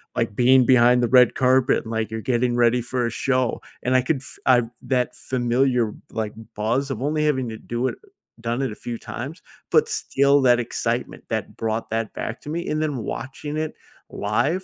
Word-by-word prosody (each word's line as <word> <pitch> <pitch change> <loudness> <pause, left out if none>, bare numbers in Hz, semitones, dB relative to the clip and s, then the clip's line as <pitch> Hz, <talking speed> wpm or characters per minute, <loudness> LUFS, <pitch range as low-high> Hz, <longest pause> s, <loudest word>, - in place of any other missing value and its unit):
like, 105 - 0
being 125 +1 +5
behind 125 0 +5
the 120 - +3
red 125 - +4
carpet, 130 0 +3
and, 110 - -8
like, 110 -1 -1
you're 110 0 -4
getting 120 0 +1
ready 120 0 +3
for 120 +1 -2
a - - -1
show, 130 -1 0 0.2
and 125 - +1
I 130 - +5
could 140 +4 0
f - - -11
I've 120 -3 +4
that 125 -2 0
familiar, 125 -2 +1 0.2
like, 110 -2 -3 0.2
buzz 120 +6 0
of 120 - -4
only 150 +2 0
having 130 -5 +1
to 110 - -6
do 120 +3 -2
it - - -3 0.5
done 120 +3 -1
it 130 -5 -1
a - - -7
few 120 -1 -2
times, 140 +11 -7 0.3
but 460 0 +4
still 140 - +2
that 125 -1 +5
excitement - - -3
that - - -3
brought 110 0 -2
that 110 -1 -2
back 110 - -5
to 150 - -9
me, 170 +2 -3
and 155 +1 0
then 150 -4 -1
watching 145 +6 -5
it 155 0 -2 0.4
live, 135 - 0
125 Hz, 200 wpm, -23 LUFS, 115-135 Hz, 0.5 s, being